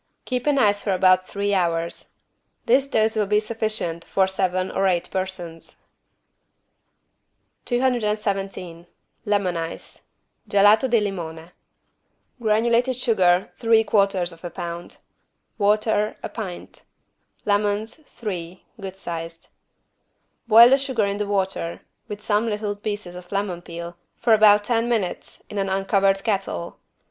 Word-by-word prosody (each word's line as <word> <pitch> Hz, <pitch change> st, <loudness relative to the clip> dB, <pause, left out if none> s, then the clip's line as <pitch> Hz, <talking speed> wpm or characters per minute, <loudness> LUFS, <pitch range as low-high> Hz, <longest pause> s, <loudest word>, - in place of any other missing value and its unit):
Keep 250 Hz, +1 st, -2 dB
in 290 Hz, -1 st, +3 dB
ice 205 Hz, -5 st, +3 dB
for 200 Hz, -, 0 dB
about 185 Hz, 0 st, +4 dB
three 200 Hz, 0 st, -1 dB
hours. 170 Hz, -3 st, -1 dB, 0.6 s
This 265 Hz, +3 st, +3 dB
dose 220 Hz, -3 st, +1 dB
will 210 Hz, -2 st, +1 dB
be 210 Hz, +1 st, +3 dB
sufficient 215 Hz, -6 st, -3 dB
for 190 Hz, -, +1 dB
seven 185 Hz, -1 st, -1 dB
or 195 Hz, -, +1 dB
eight 175 Hz, -2 st, 0 dB
persons. 185 Hz, -3 st, -5 dB, 1.9 s
217 210 Hz, -8 st, -1 dB, 0.4 s
LEMON 200 Hz, -4 st, +1 dB
ICE 165 Hz, 0 st, -6 dB, 0.5 s
(Gelato 205 Hz, +5 st, +5 dB
di 235 Hz, -1 st, +4 dB
limone) 170 Hz, -4 st, -5 dB, 0.9 s
Granulated 235 Hz, +3 st, +2 dB
sugar, 190 Hz, -7 st, +2 dB
3/4 225 Hz, -1 st, +4 dB, 0.6 s
lb. 170 Hz, -1 st, -7 dB, 0.6 s
Water, 210 Hz, +1 st, +1 dB
a -, -, -4 dB
pint. 195 Hz, -6 st, -7 dB, 0.6 s
Lemons, 205 Hz, +1 st, 0 dB
three 185 Hz, -5 st, -7 dB, 0.2 s
(good 190 Hz, -1 st, -7 dB
sized). 165 Hz, -2 st, -6 dB, 1.0 s
Boil 230 Hz, +2 st, +8 dB
the 270 Hz, -, +5 dB
sugar 260 Hz, -6 st, 0 dB
in 200 Hz, 0 st, -2 dB
the 210 Hz, 0 st, -2 dB
water, 190 Hz, -4 st, -2 dB, 0.3 s
with 210 Hz, 0 st, -7 dB
some 210 Hz, +2 st, +1 dB
little 210 Hz, -1 st, -2 dB
pieces 205 Hz, -3 st, -5 dB
of 180 Hz, 0 st, -11 dB
lemon 195 Hz, -3 st, -2 dB
peel, 170 Hz, 0 st, -8 dB, 0.2 s
for 235 Hz, -, +3 dB
about 210 Hz, -1 st, +6 dB
ten 230 Hz, +1 st, 0 dB
minutes, 215 Hz, -7 st, -3 dB
in 205 Hz, -, -5 dB
an 195 Hz, 0 st, -1 dB
uncovered 195 Hz, 0 st, +1 dB
kettle. 195 Hz, -, -3 dB
200 Hz, 120 wpm, -23 LUFS, 180-220 Hz, 1.9 s, Boil